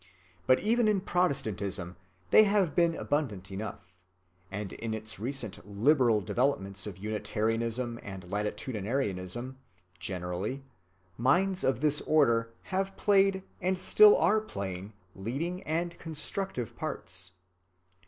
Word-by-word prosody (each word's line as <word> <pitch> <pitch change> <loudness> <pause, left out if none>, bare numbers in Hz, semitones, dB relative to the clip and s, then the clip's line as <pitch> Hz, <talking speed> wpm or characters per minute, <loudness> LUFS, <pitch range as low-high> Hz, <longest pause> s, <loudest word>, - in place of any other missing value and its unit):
But 130 - +6
even 230 +2 +3
in 205 -3 +2
Protestantism 105 - -1 0.4
they 215 - +8
have 200 -6 +2
been 170 -1 +3
abundant 105 -11 -2
enough; 95 -2 -6 0.6
and 100 -1 -5
in 115 -1 -3
its 110 -2 -7
recent 120 -2 -4
"liberal" 115 +2 +3
developments 100 -4 -1
of 95 -4 -7
Unitarianism 115 +3 -2
and 95 -2 -8
latitudinarianism 105 +1 -2 0.4
generally, 95 +7 -4 0.6
minds 180 +10 +2
of 130 -2 +1
this 150 -1 +2
order 115 -7 +3
have 195 +1 -2
played 195 -1 +3 0.2
and 185 +1 +1
still 425 - +7
are 215 - +4
playing 100 - -6 0.2
leading 145 - -3
and 170 +2 -2
constructive 160 - -3
parts. 90 0 -5
120 Hz, 115 wpm, -30 LUFS, 100-170 Hz, 0.6 s, they